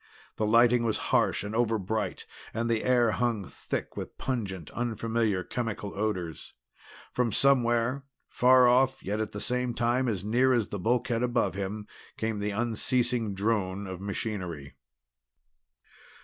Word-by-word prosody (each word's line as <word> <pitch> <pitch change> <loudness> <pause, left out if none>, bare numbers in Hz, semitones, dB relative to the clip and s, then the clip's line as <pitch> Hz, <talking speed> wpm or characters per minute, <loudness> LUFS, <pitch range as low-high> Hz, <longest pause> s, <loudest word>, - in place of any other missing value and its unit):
The 110 - 0
lighting 120 +2 +5
was 115 -2 0 0.2
harsh - - +3
and 105 +1 -5
overbright 110 -3 -1 0.3
and 115 +1 0
the 115 -2 0
air 120 -3 +3
hung 115 -4 0
thick - - -5
with - - -7
pungent 100 - -3
unfamiliar 115 -4 -1
chemical 115 -3 -4
odors. 95 -6 -3 0.6
From 125 -2 0
somewhere, 125 +1 +2 0.2
far 125 0 +5
off 130 +2 +3
yet 105 +3 -2
at 110 -1 -2
the 105 - -5
same 125 +2 -1
time 120 +2 +1
as 100 -5 -1
near 125 +5 +3
as 115 -4 +1
the 100 - -4
bulkhead 120 +3 +1
above 125 0 +1
him, 100 +2 -4 0.3
came 110 -1 -2
the 100 +1 -1
unceasing 115 0 0
drone 100 -1 -1
of 95 -1 -7
machinery. 95 -7 -4
115 Hz, 140 wpm, -28 LUFS, 100-120 Hz, 0.6 s, lighting